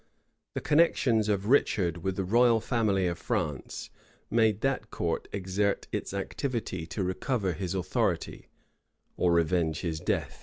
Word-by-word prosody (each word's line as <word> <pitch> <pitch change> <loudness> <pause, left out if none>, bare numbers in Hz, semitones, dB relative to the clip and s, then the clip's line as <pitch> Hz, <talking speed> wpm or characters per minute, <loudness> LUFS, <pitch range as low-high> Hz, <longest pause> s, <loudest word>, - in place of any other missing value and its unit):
The - - -2
connections 130 -8 +3
of 100 -1 0
Richard 95 - +3
with 95 +2 -2
the 95 - -1
royal 115 +4 +4
family 110 -5 +1
of 85 -1 -2
France, 75 -6 -3 0.4
made 110 -2 +3
that 135 -5 -1
court 85 -1 -2
exert 100 +1 -1
its - - -3
activity 100 - -3
to 95 +3 -3
recover 95 +1 -1
his 95 +2 -3
authority, 95 - -1 0.7
or 90 - +2
revenge 85 -1 +2
his 80 -3 -2
death. - - -2
95 Hz, 140 wpm, -29 LUFS, 90-115 Hz, 0.7 s, royal